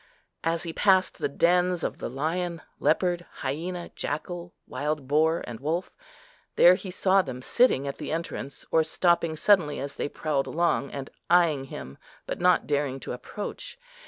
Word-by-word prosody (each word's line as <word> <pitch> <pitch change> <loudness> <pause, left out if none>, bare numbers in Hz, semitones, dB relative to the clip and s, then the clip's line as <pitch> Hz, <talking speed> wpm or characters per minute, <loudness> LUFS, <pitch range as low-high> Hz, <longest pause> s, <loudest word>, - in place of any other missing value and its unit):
As 165 0 0
he 165 -2 -5
passed 190 -1 +3
the - - 0
dens 180 +4 +2
of - - -3
the - - -4
lion, 165 +5 -2 0.2
leopard, 175 +1 +1 0.2
hyena, 170 +6 -3
jackal, 175 +3 -4
wild 150 -2 -3
boar, 160 +3 +2
and 115 -2 -7
wolf, 160 +7 -2 0.6
there 175 - +8
he 185 +1 -4
saw 190 +1 +3
them 130 -6 -7
sitting 190 - +3
at 140 - -5
the - - -4
entrance, 155 -4 -5
or 160 - +4
stopping 165 0 +1
suddenly 155 -3 +3
as 140 +1 -6
they - - -2
prowled 145 -3 -1
along, 170 -4 +1
and 140 0 -7 0.2
eyeing 165 -6 +4
him, 70 - -9 0.3
but - - -4
not 180 0 +4
daring 140 -2 -1
to - - -5
approach. 205 - -6
165 Hz, 160 wpm, -27 LUFS, 140-180 Hz, 0.6 s, there